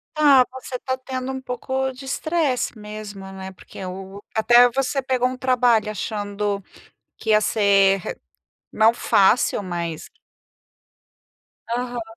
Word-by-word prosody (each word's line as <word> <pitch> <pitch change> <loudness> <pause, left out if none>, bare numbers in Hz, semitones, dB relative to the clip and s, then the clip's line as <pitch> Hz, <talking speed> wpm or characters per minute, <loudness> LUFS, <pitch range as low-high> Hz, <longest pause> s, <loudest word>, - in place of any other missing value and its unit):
Ah, 285 -4 +6
você 260 0 -8
está 260 +1 -2
tendo 260 0 -5
um 265 - -5
pouco 265 +1 -2
de 260 +1 -11
estresse 285 -4 -1
mesmo, 210 -2 -8
né, 190 0 -8
porque 190 - -11
o 190 +2 -7
até 240 +2 +6
você 270 +2 -1
pegou 255 -1 +1
um 255 - -4
trabalho 245 -4 +2
achando 205 -1 -3 0.6
que 220 - -3
ia 215 0 +6
ser 200 -3 +4
re 180 - -6 0.5
não 220 +1 +4
"fácil", 205 -1 +3
mas 170 -4 -5 1.6
Aham. 245 0 -2
235 Hz, 130 wpm, -22 LUFS, 200-260 Hz, 1.6 s, Ah